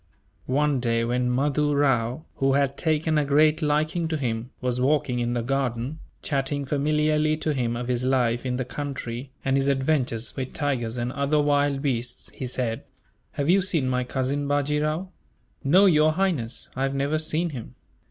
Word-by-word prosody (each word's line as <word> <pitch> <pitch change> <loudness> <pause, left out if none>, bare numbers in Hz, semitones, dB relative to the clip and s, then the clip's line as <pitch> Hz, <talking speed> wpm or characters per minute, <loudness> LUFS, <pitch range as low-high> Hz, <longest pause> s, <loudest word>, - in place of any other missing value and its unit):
One 145 +1 +2
day, 115 -1 +1
when 125 +1 0
Mahdoo 145 +3 +1
Rao, 130 -1 +1
who 135 0 +2
had 140 0 +2
taken 155 -1 +1
a - - +2
great 150 +3 +3
liking 155 +3 +1
to 160 -1 -1
him, 120 -3 -2
was 125 -1 -1
walking 130 -2 +1
in 120 0 -1
the 120 -1 -1
garden, 130 +2 -2 0.2
chatting 140 0 -1
familiarly 150 +2 +1
to 155 -1 -1
him 120 -4 -1
of 120 +1 -4
his 125 -1 0
life 125 -2 +1
in 125 -1 -2
the 130 - -2
country, 130 -2 -5 0.2
and 135 0 +2
his 135 0 +2
adventures 135 -4 0
with 130 -2 -4
tigers 125 -6 -2
and 120 +1 -2
other 140 +2 +1
wild 145 -1 +2
beasts, 125 -4 -3
he 130 - -5
said: 120 -2 -2 0.5
"Have 140 - -2
you 190 +3 +5
seen 165 -8 +1
my 125 0 0
cousin, 135 +3 -2
Bajee 145 +1 +1
Rao?" 155 +5 -1 0.5
"No, 180 +8 +5
Your 155 -4 +5
Highness, 155 -11 -1
I 130 - -3
have 135 0 0
never 140 +3 0
seen 160 +2 -1
him." 120 -6 -8
140 Hz, 180 wpm, -25 LUFS, 125-150 Hz, 0.5 s, you